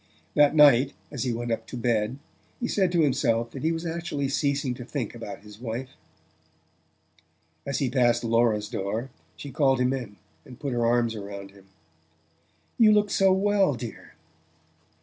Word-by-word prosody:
That 145 +1 +4
night 140 -2 +6 0.2
as 135 -3 -3
he 125 - 0
went 120 +1 -3
up 115 0 -3
to 125 - -7
bed 115 0 0 0.4
he 240 - -2
said 190 -6 +1
to 170 -2 +2
himself 120 -5 +1
that 135 - -7
he 160 - +1
was 165 +1 -4
actually 165 -4 -3
ceasing 140 -1 0
to 125 - -8
think 125 -2 -4
about 115 -4 -8
his 105 0 -14
wife... 125 +2 -5 1.8
As 140 - -1
he 135 - 0
passed 120 -2 +2
Laura's 115 -2 +2
door 110 +6 -4 0.2
she 140 - -8
called 135 -4 +2
him 125 +1 +2
in, 120 -6 -5 0.3
and 125 - -13
put 140 -3 -3
her 120 -1 +1
arms 120 -1 +2
about 100 -2 -8
him. 100 -1 -19 1.1
"You 220 -2 +7
look 210 -1 +3
so 195 -1 +4
well, 195 -4 +2
dear!" 110 -8 -9
125 Hz, 170 wpm, -26 LUFS, 115-145 Hz, 1.8 s, You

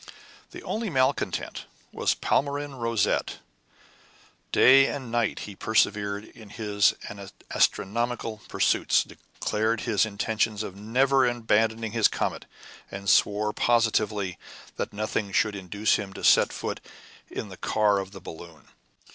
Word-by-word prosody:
The - - -11
only 220 -1 -3
malcontent 130 -3 -1 0.3
was - - 0
Palmyrin 145 0 -1
Rosette. 115 -4 0 1.1
Day 135 +1 +7
and 130 -5 -5
night 120 -2 0
he 100 - -8
persevered 105 -1 0
in 110 -2 -15
his 105 -2 +1 0.6
astronomical 115 +1 0
pursuits, - - +2
declared 110 +1 -3
his 110 -5 +2
intention 110 0 -1
of 95 - -8
never 130 +6 +2
abandoning 115 -1 +1
his 115 -2 +4
comet, - - -3 0.4
and 100 0 -8
swore 105 +2 +3
positively 110 -5 +1 0.4
that - - -3
nothing 105 -1 -3
should 105 +2 +1
induce 100 +2 0
him 100 -2 -6
to - - -9
set - - +5
foot - - -4 0.5
in - - -6
the - - -9
car 105 -2 +2
of 95 -1 -5
the 100 - -10
balloon. 80 -4 -11
110 Hz, 125 wpm, -26 LUFS, 100-120 Hz, 1.1 s, Day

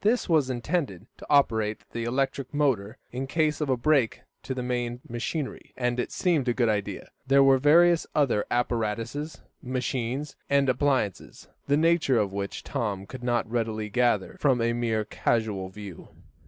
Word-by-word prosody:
This 230 +4 +2
was 155 -7 +3
intended 125 - -2
to - - -11
operate 110 -7 +2
the 115 0 -3
electric 135 +2 -1
motor 120 -9 0
in 130 +2 -4
case 155 0 0
of 150 - -1
a 130 - +2
break 135 -2 +2 0.2
to 130 - -4
the 125 - -3
main 120 -1 -2
machinery, 130 +5 -4
and 125 -1 0
it - - -2
seemed 160 -8 +1
a 120 - +1
good 120 -3 +2
idea. 105 -2 -3 0.2
There 135 +1 +6
were 135 -1 +5
various 170 +4 +5
other 135 -8 +2
apparatuses, 120 +5 -2 0.2
machines, 130 +2 -3
and 140 -1 +3
appliances, 130 -6 -1 0.2
the 145 +1 +3
nature 160 -5 +3
of 100 -3 0
which 100 0 -4
Tom 100 -4 -3
could 125 +5 -9
not 120 -2 0
readily 110 -2 -2
gather 120 -3 +1
from 135 -4 +3
a 115 0 +1
mere 115 -2 0
casual 105 -4 -1
view. 100 -2 -10
125 Hz, 165 wpm, -27 LUFS, 110-140 Hz, 0.2 s, There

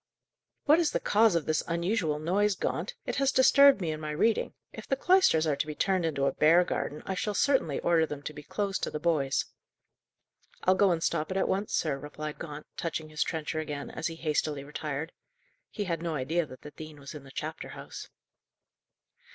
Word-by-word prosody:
"What 305 +3 +6
is 335 - +1
the - - +1
cause 215 -2 +3
of 165 - 0
this 155 -1 +1
unusual 170 -2 0
noise, 190 +6 +1
Gaunt? - - -3
It - - -3
has 275 0 +3
disturbed 275 -2 +6
me 165 -3 -1
in 155 - -4
my 155 -1 -5
reading. 195 +10 +1 0.2
If - - -9
the 270 - +1
cloisters 315 - +4
are 150 -2 +1
to 145 - -2
be 150 - -5
turned 185 +2 +1
into 140 -3 0
a 135 - +2
bear 165 +6 +5
garden, 150 -3 -3
I 190 - -2
shall 205 +2 -2
certainly 265 - +2
order 165 -2 +3
them 145 -1 -7
to 150 - -5
be 150 - -9
closed 195 +5 -2
to - - -1
the 150 - -4
boys." 150 -5 +1 1.2
"I'll 185 - +5
go 195 +1 +4
and 165 -2 0
stop 155 -2 0
it 190 - -2
at - - +1
once, 200 +2 -1
sir," 140 -4 0
replied 150 +1 -7
Gaunt, 150 -2 -7
touching 160 -2 -3
his 155 0 -4
trencher 160 -1 -1
again, 150 -2 -5
as 160 - -3
he 165 - -5
hastily 150 -3 -1
retired. 150 +2 -4 0.6
He 210 - -4
had 170 -4 -2
no 165 -2 -2
idea 155 +5 0
that 130 -1 -12
the 150 - -9
dean 155 -1 -10
was 140 -1 -9
in 150 -3 -9
the 135 - -13
chapter 135 - -5
house. - - -9
160 Hz, 210 wpm, -29 LUFS, 150-190 Hz, 1.2 s, What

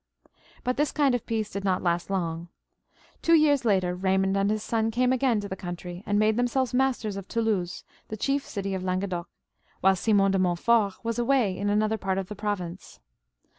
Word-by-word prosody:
But 250 0 -1
this 295 +1 +1
kind 285 -4 +2
of 245 - -2
peace 220 -2 -2
did 200 - -4
not 190 -2 0
last 175 0 0
long. 170 -3 -2 0.7
Two 330 - +5
years 290 -5 +3
later 185 -4 +2
Baymond 190 +1 +1
and 195 0 +2
his 215 0 -1
son 225 -1 0
came 250 +3 +2
again 255 -4 +2
to 200 - -5
the 190 - -5
country, 175 -1 -7
and 205 - +1
made 215 +1 +3
themselves 245 +1 0
masters 250 -6 0
of 195 -1 -7
Toulouse, 215 -6 -1 0.2
the 215 - -6
chief 275 +5 0
city 195 -1 -4
of 185 -1 -3
Languedoc, 185 -1 -2 0.5
while 190 0 +5
Simon 195 0 +3
de 195 - +1
Montfortwas 210 +5 +1
away 240 -6 +2
in 200 +2 -2
another 215 +1 +1
part 190 -1 -1
of 190 -1 -3
the 210 - -6
province. 190 -4 -5
205 Hz, 190 wpm, -26 LUFS, 190-235 Hz, 0.7 s, Two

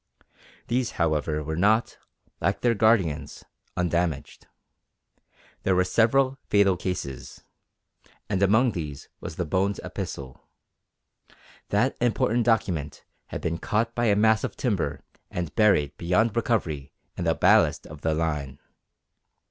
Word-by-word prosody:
These 120 0 0
however 75 -2 0
were 80 +1 -3
not, 105 +7 +2 0.4
like 100 +4 0
their 120 -1 +3
guardians, 100 -9 +1 0.3
undamaged. 85 -4 -1 1.1
There 95 - +2
were 90 - +4
several 130 +8 +2
fatal 100 -2 +4
cases, 85 -8 -5 0.8
and 95 -2 -1
among 110 +6 +4
these 75 -7 -6
was - - -7
the 90 - -2
Bones 95 +5 0
epistle. 65 -2 -7 1.2
That - - +1
important 120 -1 +1
document 85 - 0 0.2
had - - -6
been 85 +1 -2
caught 115 +5 0
by 120 - 0
a 105 -3 +4
mass 110 +1 +3
of - - -3
timber 105 -9 -1 0.3
and 85 -3 -4
buried 75 -10 +3
beyond 100 +6 +1
recovery 85 - -1 0.2
in - - -4
the - - +2
ballast - - +3
of 75 - -11
the 80 -1 0
line. 75 -4 -2
95 Hz, 125 wpm, -26 LUFS, 80-110 Hz, 1.2 s, were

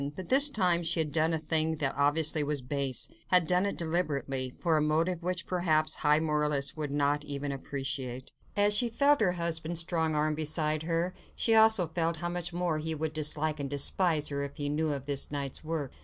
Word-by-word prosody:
But 185 +1 -8
this 275 +3 +7
time 180 -9 +2
she 165 0 0
had 155 -2 0
done 160 +1 +1
a 165 - +1
thing 160 0 0
that 145 -3 -1
obviously 150 +2 +2
was 145 -2 -2
base, 135 -1 0 0.2
had 180 -2 +6
done 180 +3 +2
it 200 - -4
deliberately, 140 -6 -2
for 165 -3 +1
a 155 - +2
motive 165 +3 0
which, 180 0 -3
perhaps, 160 -4 +1
high 150 0 +3
moralists 150 -3 0
would 150 -2 -4
not 145 +1 0
even 145 -1 -4
appreciate. 135 -2 -5 0.2
And 205 - +3
as 205 - +2
she 235 +3 +1
felt 280 +3 +2
her 185 -4 +2
husband's 170 -1 -3
strong 160 -2 -1
arm 150 +1 +1
beside 155 0 0
her, 170 +2 -1 0.2
she 225 - +2
also 220 -4 +5
felt 165 0 -2
how 175 +2 -3
much 175 0 -4
more 175 -2 -1
he 160 +1 -3
would 155 0 -3
dislike 155 0 -1
and 140 -1 -4
despise 150 +2 +1
her, 140 -1 -3
if 140 0 -6
he 145 -1 -3
knew 155 +1 0
of 140 -2 -4
this 140 -1 -2
night's 140 -1 -5
work. 155 -4 -4
155 Hz, 210 wpm, -29 LUFS, 145-175 Hz, 0.2 s, this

